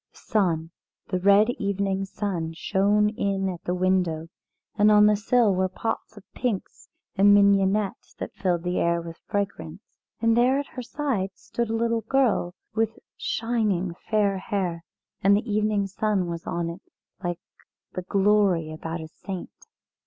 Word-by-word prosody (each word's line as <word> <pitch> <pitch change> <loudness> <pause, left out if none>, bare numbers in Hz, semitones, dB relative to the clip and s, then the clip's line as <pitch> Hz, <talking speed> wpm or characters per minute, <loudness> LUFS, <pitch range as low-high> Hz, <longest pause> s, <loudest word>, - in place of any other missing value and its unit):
The - - -20
sun, 170 -6 0 0.4
the 185 - 0
red 200 +4 +5
evening 195 -1 -1
sun, 185 -5 -3
shone 205 +4 +2
in 195 -2 -1
at 180 -3 -5
the 180 - 0
window, 180 -3 0 0.5
and 210 +1 +5
on 210 0 +7
the 210 0 +5
sill 220 0 +3
were 185 0 +1
pots 220 +2 -4
of 205 - -11
pinks 235 -7 -3 0.3
and 205 +1 +6
mignonette 200 0 +2
that - - -6
filled 175 -3 -1
the 180 0 -1
air 170 0 +2
with 165 0 -8
fragrance. 200 -3 -3 0.4
And 230 0 +3
there 250 +3 +4
at 285 - -1
her 255 - -5
side 235 -8 -2
stood 235 -1 -4
a 225 - 0
little 230 0 +1
girl 225 -7 +1 0.2
with 225 0 0 0.2
shining 215 -6 -1 0.2
fair 205 -3 +2
hair, 180 -4 -2 0.4
and 200 +1 +5
the 225 +4 -4
evening 210 -1 +1
sun 195 -1 0
was 170 -1 -6
on 170 -1 -1
it 175 +4 -10 0.4
like 175 -1 -2 0.6
the 185 - -3
glory 195 -4 +2
about 165 +1 -5
a 160 - -7
saint. 185 +3 -7
200 Hz, 160 wpm, -25 LUFS, 180-215 Hz, 0.6 s, on